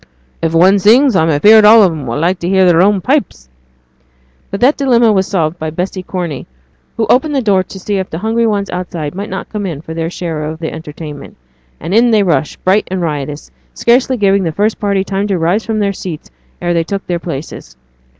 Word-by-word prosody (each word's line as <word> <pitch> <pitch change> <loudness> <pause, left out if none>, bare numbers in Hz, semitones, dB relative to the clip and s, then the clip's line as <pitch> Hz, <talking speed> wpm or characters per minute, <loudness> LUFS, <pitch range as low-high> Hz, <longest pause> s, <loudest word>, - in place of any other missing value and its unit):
'If 165 0 -1
one 190 +4 +5
sings 240 +5 +4
I'm 160 -2 +2
afeard 210 +9 +6
all 215 +1 +7
on 185 - +3
'em 150 -5 -6
will 115 - -3
like 175 +4 0
to 170 - -3
hear 190 -1 +3
their 175 -1 +4
own 200 0 +3
pipes.' 185 - -1 1.0
But 200 - -5
their 255 +3 +5
dilemma 240 -6 +2
was 190 -1 +1
solved 170 -3 -1
by 155 - -3
Bessy 180 +4 -4
Corney, 175 -7 -5 0.5
who 225 - +1
opened 270 +7 +1
the - - +2
door 200 -4 +3
to 190 +1 -10
see 200 +2 -2
if 190 -1 -3
the 160 - -5
hungry 225 +4 0
ones 200 -2 -2
outside 170 -4 -5
might 200 +3 -6
not - - -6
come 205 -2 -4
in 160 -6 -5
for 160 +1 -9
their 165 0 -3
share 165 -3 -5
of 155 +1 -5
the 160 -1 -5
entertainment; 150 -2 -9 0.4
and 175 - -5
in 235 +3 +4
they 215 -3 +3
rushed, 165 -4 -1
bright 190 +3 +2
and 190 0 -3
riotous, 150 -2 -4 0.2
scarcely 255 +2 +2
giving 200 -2 +2
the 165 -3 -1
first 210 +6 -1
party 200 -2 0
time 195 +1 -2
to 195 -3 0
rise 175 +6 0
from 220 -1 -1
their 200 -2 0
seats 175 - -8 0.3
ere 175 0 -1
they 165 -1 +1
took 195 +4 -5
their 175 -1 -2
places. 135 - -8
185 Hz, 220 wpm, -14 LUFS, 165-210 Hz, 1.0 s, all